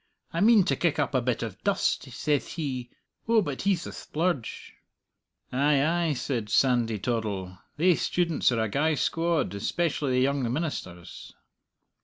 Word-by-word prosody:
'I 170 - -1
mean 215 -1 +6
to - - +1
kick 170 -4 0
up - - 0
a 130 - +2
bit 120 -1 -1
of 110 -4 -4
a - - -29
dust,' - - 0 0.2
thays 145 -2 +1
he. 130 -7 -4 0.4
Oh, 225 -2 +4
but 145 -5 -4
he's 195 -3 +1
the - - -6
splurge!" 160 -6 -3 0.8
"Ay, 140 +2 +3
ay," 165 -1 +1
said 120 -5 -3
Sandy 120 -2 +2
Toddle, 100 -4 -3 0.2
"thae 180 +4 +5
students 165 +3 +1
are 115 -2 0
a - - 0
gey 150 +9 +1
squad 165 - 0
especially 145 +5 -1
the 125 - +3
young 135 -3 +1
ministers." 120 - -5
140 Hz, 160 wpm, -27 LUFS, 115-165 Hz, 0.8 s, mean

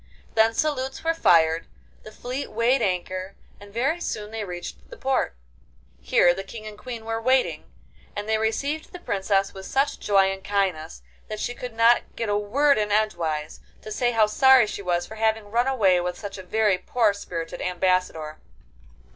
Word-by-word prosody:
Then 225 0 +3
salutes 270 -2 -1
were 330 0 +2
fired, 165 - +3 0.3
the 215 - -11
fleet 250 +5 -5
weighed 235 +4 +2
anchor, 185 -1 -2 0.2
and 205 0 -13
very 275 +10 0
soon 210 -9 -4
they 220 -1 -4
reached 175 -3 -8
the - - -11
port. 265 - 0 0.6
Here 120 - +4
the 195 +2 -5
King 215 +3 -10
and 215 -1 -8
Queen 230 +1 -8
were 225 0 -2
waiting, 255 +2 +1 0.5
and 205 0 -4
they 220 0 +1
received 280 - -2
the 360 - -7
Princess 195 - 0
with 190 0 -9
such 275 +2 0
joy 195 -2 +3
and 195 0 -7
kindness 180 - -1 0.2
that 215 - -5
she 245 - -2
could 245 -1 -8
not 230 +1 +3
get 230 -2 -3
a 205 - +2
word 260 +7 +2
in 210 -1 -1
edgewise, 165 -8 -1 0.2
to 215 - -8
say 240 +3 +1
how 225 -2 +4
sorry 260 +3 +6
she 210 - -6
was 175 -2 0
for 220 - -10
having 220 -1 0
run 240 +3 +2
away 195 -9 +3
with 180 0 -3
such 200 -2 -7
a - - -5
very 200 0 +1
poor 220 +2 +2
spirited 165 -4 -6
Ambassador. 180 -4 -1
215 Hz, 180 wpm, -24 LUFS, 185-240 Hz, 0.6 s, sorry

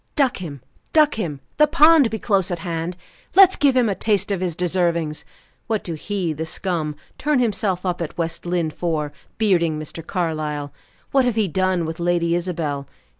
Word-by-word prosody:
"Duck 275 -5 +2
him! 150 -8 -7 0.3
Duck 305 -2 +5
him! 155 -11 -4 0.2
The 300 +1 +6
pond 305 -3 +6
be 220 - -3
close 195 -4 +1
at 175 - -2
hand. 170 +1 -3 0.4
Let's 380 -1 +8
give 280 -3 +3
him 245 -2 +4
a 205 - +1
taste 205 +1 0
of 190 -2 -1
his 175 -3 -1
deservings! 170 -3 0 0.4
What 220 -2 -1
do 170 - -4
he 180 0 -2
the 155 +2 -4
scum, 160 -4 -2 0.2
turn 300 -1 +2
himself 205 -6 0
up 180 -1 -1
at 165 - -5
West 165 -1 -2
Lynne 175 -2 -1
for, 155 -3 -2 0.2
bearding 175 -7 +2
Mr. 155 +2 -6
Carlyle? 155 -5 -3 0.4
What 270 -2 +4
have 245 -3 +1
he 220 -3 +2
done 185 0 0
with 160 +1 -5
Lady 170 -1 +1
Isabel? 165 -6 -2
175 Hz, 180 wpm, -22 LUFS, 160-215 Hz, 0.4 s, Let's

